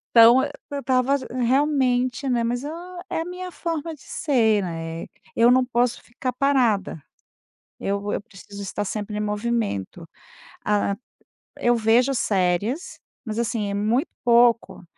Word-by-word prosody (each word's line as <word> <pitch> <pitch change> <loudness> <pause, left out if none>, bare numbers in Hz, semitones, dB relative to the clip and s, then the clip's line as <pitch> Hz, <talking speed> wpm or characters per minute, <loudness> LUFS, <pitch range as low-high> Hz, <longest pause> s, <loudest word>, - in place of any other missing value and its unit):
Então 235 +3 +8
e 285 - -3 0.2
eu 285 - -2
estava 260 +1 +2 0.2
realmente, 255 0 +1
né, 240 -2 +1
mas, 245 +3 -1
ah, 350 +3 -7
é 325 - -1
a - - -4
minha 360 0 -6
forma 330 -2 -4
de 280 - -14
ser, 225 -9 +1
né, 165 -1 -5 0.3
eu 235 +1 +5
não 255 0 +5
posso 240 -1 0
ficar 250 +1 -5
parada. 240 - +1 0.8
Eu 200 +1 -2
eu - - -2
preciso 200 -1 -12
estar 200 +1 -3
sempre 210 +1 -4
em - - -1
movimento, 210 - -2 0.6
ah, 205 -1 +1 0.6
eu 240 0 +3
vejo 235 +4 +3
séries, 205 - 0 0.2
mas 220 -2 -5
assim 225 -3 -1
é - - -3
muito 225 +9 +1
pouco, 235 -4 +3
235 Hz, 145 wpm, -23 LUFS, 210-270 Hz, 0.8 s, Então